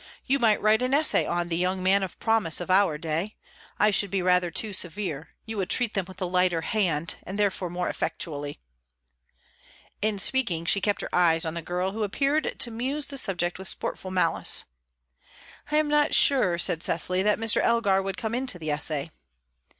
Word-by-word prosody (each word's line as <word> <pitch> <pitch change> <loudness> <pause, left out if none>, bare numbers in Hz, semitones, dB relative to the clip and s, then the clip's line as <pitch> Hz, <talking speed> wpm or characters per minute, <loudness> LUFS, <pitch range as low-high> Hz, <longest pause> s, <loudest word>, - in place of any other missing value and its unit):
You 275 +2 +2
might 220 -4 +3
write 215 +2 +3
an 255 +2 +1
essay 305 +2 +3
on 175 0 -1
'The 165 - 0
Young 185 +1 -1
Man 195 +2 +4
of 190 -2 -5
Promise' 225 -8 +2
of 180 +1 -4
our 185 -5 +3
day. 165 +6 -3 0.4
I 210 - +4
should 200 0 +1
be 195 -1 -1
rather 180 -1 +3
too 210 +5 -1
severe; 175 -4 -1 0.2
you 220 -1 -6
would 190 -2 -2
treat 245 -3 +1
them 195 -4 -1
with 185 -1 -12
a 185 - -1
lighter 180 -2 +1
hand, 170 -5 -1
and 190 +2 -7
therefore 195 -3 0
more 175 +1 -3
effectually." 145 -3 -4 1.4
In 215 0 0
speaking, 195 -7 0
she 195 +4 +2
kept 205 +2 0
her - - -7
eyes 165 -2 +3
on 160 - -2
the 170 - -4
girl, 180 +3 -2
who 220 +2 -5
appeared 275 +9 -1
to 235 - +2
muse 265 +6 -2
the 280 - -2
subject 180 -5 -1
with 190 - -4
sportful 190 - -4
malice. 185 -1 +1 1.1
"I 300 - -1
am 305 0 +2
not 295 +1 +2
sure," 210 -11 +4
said 165 -1 0
Cecily, 180 +2 0
"that 210 +2 +2
Mr. 225 -1 +2
Elgar 205 -5 +2
would 195 0 -5
come 220 0 -4
into 250 -5 -1
the 155 -3 -4
essay." 150 +1 -1
190 Hz, 195 wpm, -26 LUFS, 175-220 Hz, 1.4 s, Man